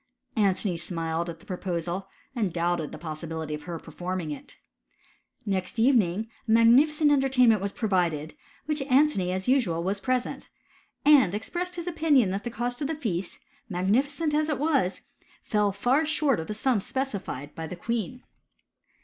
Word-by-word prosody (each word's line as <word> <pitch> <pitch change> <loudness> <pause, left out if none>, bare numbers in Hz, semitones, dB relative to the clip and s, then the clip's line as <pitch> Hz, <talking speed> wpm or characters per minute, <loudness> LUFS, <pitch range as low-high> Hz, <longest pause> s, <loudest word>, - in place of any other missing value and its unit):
Antony 195 -3 +1
smiled 165 -1 -2
at 165 -1 -7
the - - -18
proposal, 180 0 -3 0.3
and 210 -7 0
doubted 170 -2 -1
the - - -7
possibility 160 0 -5
of 150 - -5
her 175 -2 -4
performing 175 +1 -5
it. 145 - -8 0.9
Next 190 0 -2
evening! 225 -4 +3 0.2
a - - 0
magnificent 285 +7 +5
entertainment 255 -6 +4
was 200 0 -2
provided, 175 -9 0
at - - -28 0.3
which 300 -1 -1
I - - -2
Antony, 260 -9 +3
as 185 +1 -2
usual, 225 -11 +2
was 200 +2 -2
present, 255 -1 -2 0.6
and 275 -11 +6
expressed 350 +11 -3
his 345 -1 -5
opi 330 -2 -3
iiion 255 -10 +5
that 195 +2 -3
the 240 - -3
cost 245 +2 -3
of 285 - 0
the 320 - -2
feast, 195 - -3 0.3
magnificent 265 - +1
as 305 +1 +1
it 300 - 0
was, 275 - +1 0.4
fell 210 -1 +1
far 245 +10 +2
short 305 - +1
of 160 - -5
the 210 - -4
sum 230 -1 +1
specified 195 - -4
by 160 0 -6
the 180 - -6
queen. 235 +5 -3
210 Hz, 165 wpm, -27 LUFS, 175-270 Hz, 0.9 s, and